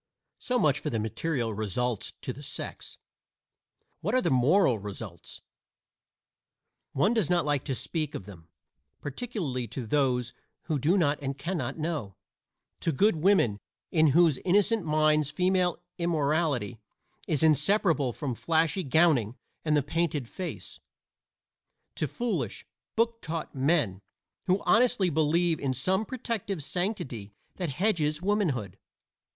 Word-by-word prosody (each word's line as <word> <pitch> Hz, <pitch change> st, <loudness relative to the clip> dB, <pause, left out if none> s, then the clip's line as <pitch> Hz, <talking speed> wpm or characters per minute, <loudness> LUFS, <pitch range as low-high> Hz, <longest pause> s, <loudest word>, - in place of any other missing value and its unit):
So 250 Hz, -, 0 dB
much 150 Hz, -, +3 dB
for -, -, -3 dB
the 115 Hz, -, -1 dB
material 115 Hz, +2 st, -2 dB
results 110 Hz, +2 st, -2 dB
to -, -, -3 dB
the -, -, -11 dB
sex. -, -, -6 dB, 1.0 s
What 210 Hz, +8 st, -1 dB
are 255 Hz, -, +4 dB
the 170 Hz, -, +1 dB
moral 130 Hz, -, +4 dB
results? 100 Hz, -3 st, -8 dB, 1.5 s
One 190 Hz, -, +3 dB
does 220 Hz, -9 st, +1 dB
not 175 Hz, -3 st, +2 dB
like 145 Hz, -3 st, +1 dB
to 135 Hz, -, -1 dB
speak 155 Hz, +2 st, -3 dB
of 95 Hz, -, -6 dB
them, 85 Hz, -5 st, -12 dB, 0.5 s
particularly 145 Hz, -, -4 dB
to 115 Hz, +3 st, -5 dB
those 125 Hz, -2 st, +1 dB, 0.3 s
who 155 Hz, -4 st, -1 dB
do 165 Hz, +9 st, +3 dB
not 150 Hz, -5 st, +2 dB
and 135 Hz, -1 st, -3 dB
can 170 Hz, +7 st, -3 dB
not 135 Hz, -3 st, -3 dB
know 150 Hz, -, -3 dB, 0.6 s
to 165 Hz, -, 0 dB
good 200 Hz, +6 st, +3 dB
women 155 Hz, -, +3 dB, 0.3 s
in 160 Hz, -2 st, +4 dB
whose 155 Hz, -1 st, +4 dB
innocent 205 Hz, +3 st, +2 dB
minds 155 Hz, -1 st, +2 dB
female 180 Hz, 0 st, +1 dB, 0.2 s
immorality 150 Hz, -8 st, 0 dB, 0.5 s
is 155 Hz, -2 st, 0 dB
inseparable 155 Hz, -, +3 dB
from 130 Hz, +2 st, -3 dB
flashy 165 Hz, -, +1 dB
gowning 140 Hz, -, +3 dB, 0.3 s
and 155 Hz, -1 st, +2 dB
the 145 Hz, -, +2 dB
painted 150 Hz, -3 st, -1 dB
face; 185 Hz, +8 st, -7 dB, 1.1 s
to -, -, -2 dB
foolish, 190 Hz, -, -3 dB, 0.3 s
book 230 Hz, 0 st, +1 dB
taught 165 Hz, 0 st, -4 dB
men 130 Hz, -, +1 dB, 0.5 s
who 185 Hz, +2 st, +2 dB
honestly 220 Hz, -6 st, +4 dB
believe 160 Hz, +2 st, +2 dB
in 130 Hz, -2 st, -1 dB
some 190 Hz, -, +1 dB
protective 225 Hz, -, -3 dB
sanctity 135 Hz, -, -3 dB, 0.2 s
that 180 Hz, -4 st, -2 dB
hedges 155 Hz, -2 st, +1 dB
womanhood. 170 Hz, -, -1 dB
155 Hz, 135 wpm, -28 LUFS, 130-180 Hz, 1.5 s, are